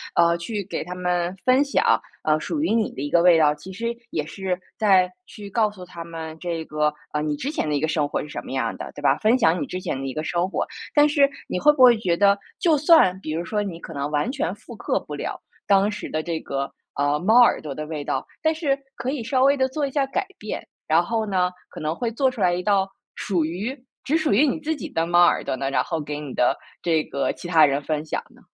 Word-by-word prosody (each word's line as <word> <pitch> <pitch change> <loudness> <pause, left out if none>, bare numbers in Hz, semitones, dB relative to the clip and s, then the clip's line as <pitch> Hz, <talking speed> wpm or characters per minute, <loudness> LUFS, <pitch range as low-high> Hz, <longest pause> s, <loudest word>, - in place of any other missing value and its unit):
呃， 170 0 +4
去 205 +4 -4
给 - - -3
他 180 - -6
们 180 0 -1
分 255 +2 +5
享， 285 - +2 0.2
呃， 155 0 +3
属 300 - -2
于 265 - +1
你 225 -2 +1
的 - - -7
一 145 - -3
个 170 +2 +4
味 175 -2 +6
道。 150 -1 +4
其 165 +6 -11
实 235 +4 -3
也 150 -2 -2
是 185 +2 -3 0.2
在 190 -4 +4 0.2
去 205 -2 -10
告 215 0 +1
诉 185 -3 -11
他 170 -1 -8
们 160 -1 -7
这 165 -2 -3
个， 150 0 0 0.2
呃， 150 - 0
你 150 -1 -1
之 275 - -3
前 300 - -2
的 - - 0
一 145 - +1
个 160 - 0
生 150 -2 0
活 - - -1
是 - - -7
什 150 - -6
么 - - -9
样 130 -4 -1
的， - - -7
对 - - -9
吧， 140 -1 +3
分 230 +4 +3
享 170 -5 +3
你 - - -1
之 185 - -5
前 160 - -3
的 135 - -4
一 135 - -4
个 155 - -3
生 175 +3 0
活。 - - -2 0.3
但 295 0 +6
是 285 -1 +4 0.2
你 - - -2
会 300 +11 +6
不 285 -3 -2
会 245 -3 +8
觉 180 -5 0
得， 200 +1 +5 0.2
就 330 -4 +3
算 295 - +5
比 155 - -5
如 170 +2 -2
说 210 +2 -1
你 180 -5 -6
可 - - -9
能 140 +1 -3
完 150 +9 0
全 280 +4 -2
复 - - -12
刻 - - -1
不 - - -8
了 - - -5 0.2
当 200 0 +4
时 210 0 -6
的 155 - -1
这 165 0 -3
个， 140 0 -3 0.3
呃， 145 +1 +1
猫 220 +7 +5
耳 240 - +5
朵 150 -3 -5
的 155 +2 -5
味 155 -2 -4
道， 135 -1 -2 0.2
但 315 0 +3
是 300 -4 0 0.2
可 250 - -4
以 270 -5 -2
稍 255 +2 +1
微 280 +1 +5
地 260 - +2
做 280 +2 -2
一 - - -7
下 280 0 +1
改 375 +9 -2
变， 210 - -6 0.2
然 160 +2 +4
后 220 +4 -1
呢， 185 -3 +1 0.2
可 - - -10
能 155 +2 -1
会 235 +1 -2
做 265 +3 +2
出 255 -3 -9
来 180 -2 +3
一 180 - -1
道 195 -1 +2 0.3
属 180 -5 0
于 215 - -4 0.2
只 295 - 0
属 315 -2 0
于 255 +10 +5
你 290 +3 0
自 315 +1 -2
己 315 - -6
的 165 -10 0
猫 175 0 +5
耳 - - +2
朵 - - -2
呢， 135 +1 -3
然 125 -2 +2
后 165 -2 -3
给 150 0 -5
你 145 -4 -7
的 125 - +3 0.3
这 160 -2 +2
个 140 - -1
其 175 - -9
他 160 -3 +6
人 140 0 0
分 155 +1 -2
享 155 - -2
呢？ - - -21
180 Hz, 290 characters per minute, -23 LUFS, 155-240 Hz, 0.3 s, 会